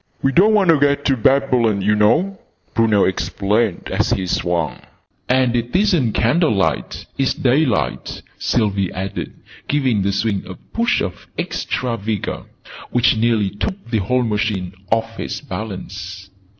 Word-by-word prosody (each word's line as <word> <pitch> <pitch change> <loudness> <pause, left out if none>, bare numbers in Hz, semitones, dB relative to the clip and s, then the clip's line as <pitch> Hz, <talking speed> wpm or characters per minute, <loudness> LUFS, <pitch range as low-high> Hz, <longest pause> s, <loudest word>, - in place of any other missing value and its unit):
"We 135 - +3
don't 205 +8 +5
want 195 -5 +5
to 155 - +3
get 140 0 +2
to 135 - +3
Babylon, 120 -5 +2
oo 105 +2 +3
know!" 155 - +2 0.3
Bruno 110 -3 +3
explained 100 +2 0
as - - +1
he 95 - 0
swung. 85 -3 -1 0.5
"And 125 -1 +3
it 120 +3 -2
isn't 180 - +2
candlelight: 115 - +1
it's 135 - +1
daylight!" 125 - 0 0.2
Sylvie 100 -5 0
added, 95 +1 -4 0.4
giving 130 -8 +1
the 100 +1 +1
swing 100 0 0
a 95 - -7
push 235 +1 -1
of 90 - -5
extra 120 -2 -2
vigour, 105 -1 -4 0.4
which 120 -1 +3
nearly 110 -3 +1
took 120 - -5
the 110 - +2
whole 125 +6 +1
machine 105 -5 -1 0.2
off 115 0 0
its - - -4
balance. 95 - -7
115 Hz, 140 wpm, -19 LUFS, 100-135 Hz, 0.5 s, don't